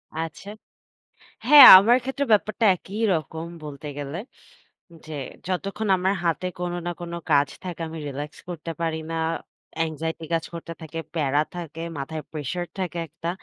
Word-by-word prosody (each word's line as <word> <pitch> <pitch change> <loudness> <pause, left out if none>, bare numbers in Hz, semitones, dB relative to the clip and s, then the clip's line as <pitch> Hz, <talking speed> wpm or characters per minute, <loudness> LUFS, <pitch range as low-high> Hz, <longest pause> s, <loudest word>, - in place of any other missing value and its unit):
আচ্ছা। 165 +5 -5 1.0
হ্যাঁ, 290 -3 +11
আমার 235 +6 +5
ক্ষেত্রে 270 +2 -2
ব্যাপারটা 215 +2 +2
একইরকম 175 -5 -2 0.2
বলতে 150 0 -8
গেলে। 145 +3 -5 0.9
যে, 155 - -8 0.3
যতক্ষণ 195 +4 -3
আমার 190 +2 +1
হাতে 170 +2 0
কোনো 175 0 -2
না - - 0
কোনো 170 0 -5
কাজ 145 0 +5 0.2
থাকে, 175 -2 -6
আমি 160 +1 -7
রিল্যাক্স 145 +2 -6
করতে 165 -1 -5
পারি 160 -1 -1
না। - - -2 0.7
anxiety 160 +1 -4
কাজ 165 -1 0
করতে 165 0 -7
থাকে, 160 +1 -6 0.2
প্যারা 145 -2 +2
থাকে, 165 -2 -7 0.2
মাথায় 155 +3 -5
প্রেশার 155 +3 -3
থাকে 180 -2 -3
একটা। 165 - -6
165 Hz, 145 wpm, -24 LUFS, 155-185 Hz, 1.0 s, হ্যাঁ